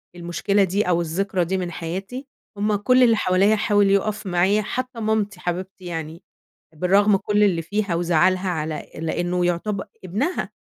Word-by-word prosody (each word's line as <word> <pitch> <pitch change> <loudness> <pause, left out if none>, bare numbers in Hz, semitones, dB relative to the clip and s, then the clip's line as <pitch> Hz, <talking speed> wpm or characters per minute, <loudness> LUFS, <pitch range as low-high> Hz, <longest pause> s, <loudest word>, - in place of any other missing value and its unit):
المشكلة 175 +4 0
دي، 195 +1 0
أو 175 -1 +2
الذكرى 180 +2 -1
دي 190 +3 -1
من 180 -2 -3
حياتي، 195 - -6 0.3
هُم 210 +1 +1
كُلّ 255 +5 +4
اللي 230 -2 +5
حواليّا 195 +2 +3
حاول 205 -1 +2
يقف 200 +2 0
معايا، 185 +4 +2
حتّى 255 +3 -4
مامتي 215 -3 -1
حبيبتي 185 +1 -5
يعني، 165 0 -6 0.5
بالرغم 195 +5 +3
كُلّ 210 +2 0
اللي 175 -5 +2
فيها 205 +1 -2
وزعلها 175 +2 +2
على 155 -2 -4
لأنه 175 +2 -1
يعتب 190 +3 -1 0.2
ابنها 240 - -2
190 Hz, 150 wpm, -22 LUFS, 175-210 Hz, 0.5 s, اللي